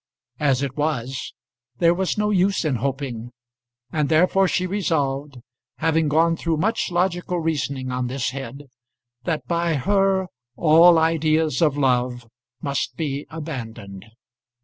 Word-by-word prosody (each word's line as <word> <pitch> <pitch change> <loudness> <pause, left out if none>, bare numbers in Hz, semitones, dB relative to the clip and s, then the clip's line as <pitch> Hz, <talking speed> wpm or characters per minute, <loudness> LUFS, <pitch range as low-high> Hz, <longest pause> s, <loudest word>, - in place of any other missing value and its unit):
As 140 -3 +2
it 135 -2 -3
was, 135 -4 -2 0.5
there 170 +3 +4
was 190 +3 -1
no 210 0 +1
use 195 -1 +2
in 140 -5 +1
hoping; 130 -2 -3 0.6
and 150 -2 0
therefore 180 +4 +4
she 180 0 0
resolved 145 -8 -1 0.4
having 160 +2 +1
gone 165 +3 +3
through 165 -1 -1
much 220 +8 0
logical 175 0 0
reasoning 140 -5 -2
on 125 0 -2
this 125 0 -2
head 135 +1 -7 0.6
that 160 -2 -2
by 170 -1 0
her 195 +5 +2 0.3
all 165 +1 +6
ideas 160 -2 +2
of 150 -3 +3
love 125 -3 0 0.4
must 140 -3 -2
be 145 -2 -3
abandoned. 115 - -7
155 Hz, 130 wpm, -23 LUFS, 135-170 Hz, 0.6 s, all